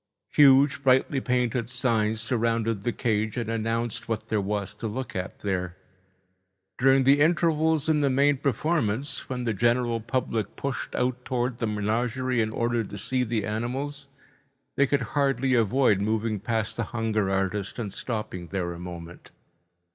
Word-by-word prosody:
Huge 140 -1 +5
brightly 130 0 +3
painted 125 -2 0
signs 115 -4 0
surrounded 115 -2 0
the 120 - -1
cage 110 -3 -1
and 115 -2 -2
announced 115 0 -2
what 110 -1 -3
there 110 -2 +1
was 100 0 -3
to 115 - -5
look 125 +5 -5
at 90 0 -4
there. 90 -3 -2 1.0
During 135 +1 +5
the 140 +2 +5
intervals 160 -1 +3
in 155 -2 +3
the 140 - +3
main 140 +2 +3
performance, 140 -2 -1
when 125 -1 -3
the 115 -2 0
general 120 +2 +1
public 115 -3 -2
pushed 140 -2 -4
out 125 0 -1
towards 125 -2 -2
the 115 - 0
menagerie 115 +4 0
in 110 - 0
order 115 +1 0
to 100 - -8
see 125 +5 -1
the 115 -3 -1
animals, 135 +6 -3 0.7
they 140 - +3
could 140 0 +1
hardly 135 -2 +1
avoid 115 -2 +3
moving 110 0 0
past 110 +1 -1
the 115 - 0
hunger 110 -3 -1
artist 95 +1 -1
and 105 -5 -4
stopping 105 -8 -5
there 90 -1 -3
a 85 - -9
moment. 85 -1 -9
115 Hz, 155 wpm, -26 LUFS, 105-130 Hz, 1.0 s, Huge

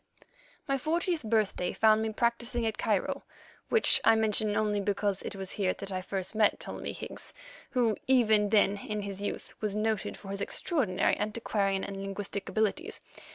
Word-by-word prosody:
My 275 -1 +1
fortieth 335 +3 0
birthday 215 -5 0
found 220 0 +4
me 220 0 -1
practising 235 +1 0
at 220 - -2
Cairo, - - 0 0.5
which 455 - +5
I 225 - +6
mention 215 -1 +2
only 210 -1 +1
because 200 0 0
it - - -5
was 190 -1 -4
here 190 -3 0
that 190 -2 -5
first 195 +1 -3
I - - -4
met 210 - +4
Ptolemy - - -6
Higgs, - - -7 0.3
who, 235 -4 +2
even 220 -5 +4
then 205 -1 +4
in 210 +1 -4
his 200 -1 -5
youth, 205 - -4
was 210 -2 -1
noted 215 -1 -1
for 195 - -11
his 200 0 -3
extraordinary 205 - +1
antiquarian 205 -2 0
and 200 -1 -5
linguistic 195 0 -4
abilities. 220 - -1
210 Hz, 165 wpm, -30 LUFS, 200-225 Hz, 0.5 s, I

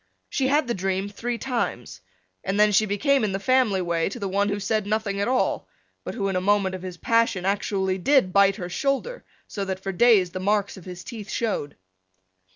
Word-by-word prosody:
She 265 -2 +1
had 295 +2 +2
the 240 - 0
dream 190 0 -2
three 235 +4 -4
times, 230 - -3 0.4
then 210 +2 +3
she 215 +2 +3
became 275 +6 +2
in 205 -3 0
the 195 - -1
family 220 -4 +2
way 170 0 0
to - - -7
the 200 - -2
one 200 +2 +1
who 205 0 -2
said 215 +1 -1
nothing 210 -2 -1
at 200 - 0
all 255 +1 0 0.4
but - - -6
who 200 -4 -1
in 195 - -1
the 185 - 0
moment 200 -1 +2
of 185 - -6
his 180 -1 -7
passion 230 -2 +1
actually 195 -1 0
did 260 -4 +3
bite 200 0 +5
her 180 -4 -5
shoulder 275 - -2 0.2
so 200 - -4
that 190 -1 -3
for 195 - -2
days 200 -3 +4
the 185 - -5
marks 200 +1 0
of 190 - -13
his 180 -1 -8
teeth 225 -4 -8
showed. 210 -11 -2
200 Hz, 210 wpm, -24 LUFS, 190-230 Hz, 0.4 s, bite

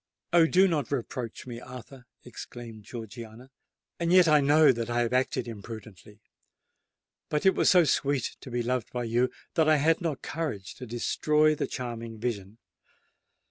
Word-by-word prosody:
"Oh! 170 -2 +6
do 185 +3 +5
not 150 -8 -1
reproach 120 -3 -4
me, 120 -2 -7
Arthur!" 125 0 -11 0.2
exclaimed 120 -3 -10
Georgiana: 115 +2 -9 0.5
"and 170 0 0
yet 180 -1 +7
I 150 -2 +5
know 150 +2 +6
that 115 -1 -3
I 120 0 +1
have 120 +1 -1
acted 130 -1 0
imprudently. 105 -2 -10 1.1
But 150 +3 -1
it 190 - +6
was - - +3
so 180 -2 +6
sweet 140 -3 0
to - - -9
be 120 0 -1
beloved 125 -1 -2
by 125 -1 -3
you, 120 +2 +1 0.2
that 160 -2 +3
I 155 - +6
had 160 +4 +2
not 160 -5 -3
courage 145 - -4
to 125 - -8
destroy 150 +6 +2
the 150 - -2
charming 115 -3 -6
vision! 105 -3 -4
125 Hz, 165 wpm, -28 LUFS, 115-150 Hz, 1.1 s, yet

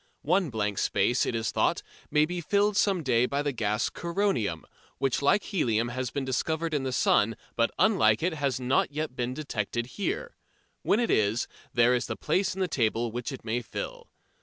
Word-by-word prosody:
One 180 +2 +2
blank 105 -4 -2
space, 120 - +2
it - - -1
is 115 0 -1
thought, - - +1 0.3
may 150 0 +4
be 175 +2 -4
filled 205 +4 +2
some 195 -4 +2
day 125 -2 +3
by 140 +2 -1
the 145 - 0
gas 110 -3 0
coronium, 170 - -1 0.3
which 135 0 0
like 145 +9 +3
helium 120 - 0
has 130 0 -3
been 135 +2 -3
discovered 160 +5 -1
in 145 - +1
the 130 -1 -2
sun, 115 -2 +2 0.2
but 115 0 +2
unlike 210 -6 +3
it 175 0 +1
has 140 -4 -1
not 130 +2 +1
yet 150 -2 -3
been 125 +1 -2
detected 120 -5 -3 0.2
here. 485 - -2 0.5
When 210 - +2
it 240 - +1
is, 110 +2 +2 0.2
there 120 +1 +4
is 125 - 0
the - - -4
place 190 -1 0
in 190 - -4
the 185 - +2
table 115 -5 0
which 120 +4 -4
it 135 - -9
may 120 +2 -1
fill. 115 - -7
130 Hz, 195 wpm, -28 LUFS, 115-165 Hz, 0.5 s, may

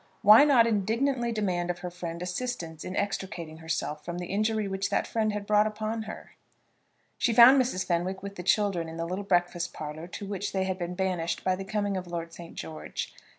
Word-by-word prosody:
Why 215 +7 +9
not 260 -6 +6
indignantly 235 +4 +1
demand 185 -5 -1
of 175 - -1
her 180 - -4
friend 170 -1 -5
assistance 180 -5 -4
in 185 - -5
extricating 185 -5 -3
herself 160 -2 -3
from 175 0 -5
the 175 - -4
injury 215 0 +1
which 195 0 -2
that - - +1
friend 220 -1 0
had 205 -1 -4
brought 210 +1 +4
upon 215 +1 -3
her? - - -9 0.9
She 235 - +2
found 255 +4 +9
Mrs. 240 -7 -1
Fenwick 180 +2 -1
with 200 0 -6
the 180 - -5
children 190 -3 +1
in 165 - -8
the 165 - -2
little 185 +4 -3
breakfast 175 -3 0
parlour 155 +2 -6
to 190 +3 -7
which 200 0 -4
they 190 -1 +1
had 190 0 -2
been 175 0 -3
banished 180 -3 -1
by 185 0 +2
the 195 - -6
coming 205 0 -1
of 185 -1 -5
Lord 170 -1 -5
St. 170 0 -10
George. 80 -1 -6
190 Hz, 205 wpm, -28 LUFS, 175-215 Hz, 0.9 s, Why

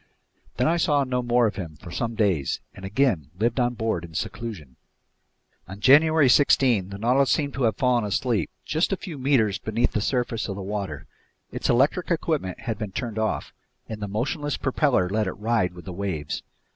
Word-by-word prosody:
Then 125 - +2
I 170 +2 +2
saw 145 -3 +2
no 125 -1 -1
more 120 0 +3
of 105 -3 -1
him 85 -5 -6
for 85 +2 -11
some 115 +5 -2
days 95 -11 +1
and 95 - -12
again 95 - +1
lived 115 +5 0
on 120 0 +1
board 110 -6 -1
in 85 -2 -11
seclusion. 85 - -5 0.9
On 95 +1 -9
January 150 +4 +6
16 125 -6 +4
the 100 - -7
Nautilus 125 +5 +2
seemed 145 -3 +1
to 130 -2 0
have 110 - +2
fallen 125 -4 +2
asleep 105 -1 0 0.2
just 160 +6 0
a 195 - 0
few 175 -8 -8
meters 115 -7 +2
beneath 110 +3 0
the 105 - -1
surface 120 -1 -1
of 100 - -4
the 100 - -6
water. 95 -7 -4 0.5
Its - - -3
electric 145 +8 +2
equipment 155 - -1
had 115 -2 -4
been 105 -3 -4
turned 110 +1 -4
off, 110 0 -2 0.3
and 110 -1 -7
the 105 - -3
motionless 145 - -2
propeller 135 - +1
let 105 +2 0
it - - -2
ride 105 -4 0
with 90 - -11
the 95 - -6
waves. 85 -6 -3
115 Hz, 195 wpm, -25 LUFS, 100-130 Hz, 0.9 s, January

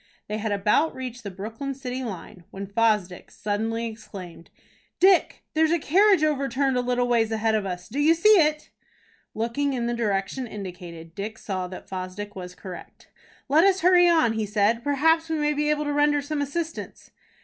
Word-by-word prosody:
They 210 +1 -3
had 220 0 -2
about 210 +10 +2
reached 250 -2 -6
the 205 - -6
Brooklyn 225 +8 -6
city 260 -1 -5
line, 190 -5 -8
when 195 +1 -7
Fosdick 205 -3 0
suddenly 225 +2 -2
exclaimed: 200 -7 -9 0.5
"Dick, 375 -1 +4
there's 315 0 +3
a 340 - +3
carriage 375 +3 +4
overturned 275 -2 +1
a 250 - +2
little 245 0 0
ways 230 -2 +2
ahead 220 0 +1
of 210 -2 0
us. 180 -1 -5
Do 260 +6 -4
you 315 +3 +5
see 410 +6 +3
it?" 305 -1 +1 0.6
Looking 235 +6 -1
in 240 -2 -2
the 240 - -1
direction 225 +2 -1
indicated, 180 -5 -9
Dick 210 +4 -6
saw 185 -4 -4
that 185 0 -10
Fosdick 190 +2 -6
was 180 -1 -8
correct. 185 -3 -11 0.4
"Let 300 +4 +5
us 385 -1 +3
hurry 355 0 +6
on," 320 -9 +3
he 220 -1 -2
said. 215 +3 +1
"Perhaps 320 +4 +2
we 320 - 0
may 300 0 +1
be 300 +1 0
able 300 0 +1
to 290 0 -2
render 290 0 +2
some 295 0 -3
assistance." 320 +4 -5
235 Hz, 180 wpm, -25 LUFS, 205-295 Hz, 0.6 s, hurry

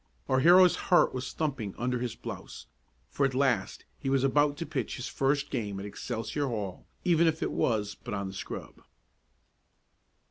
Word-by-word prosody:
Our 130 - +3
hero's 180 +5 +7
heart 180 - +5
was 130 0 -4
thumping 135 -11 -3
under 125 +1 -1
his 120 -2 -3
blouse, - - -8 0.5
for 140 - 0
at 135 -2 +1
last 130 -7 0
he 135 - -2
was 135 -1 +2
about 145 +1 +3
to 170 - -3
pitch 140 -8 -3
his 120 - -5
first 140 +1 0
game 100 -3 -2
at 100 - -6
Excelsior 115 +6 -3
Hall, 105 -7 -4 0.2
even 170 -2 +4
if 160 0 0
it - - -1
was 105 -3 0
but 105 - -6
on 100 0 -3
the 95 - -7
scrub. 95 - -7
130 Hz, 175 wpm, -29 LUFS, 110-145 Hz, 0.5 s, hero's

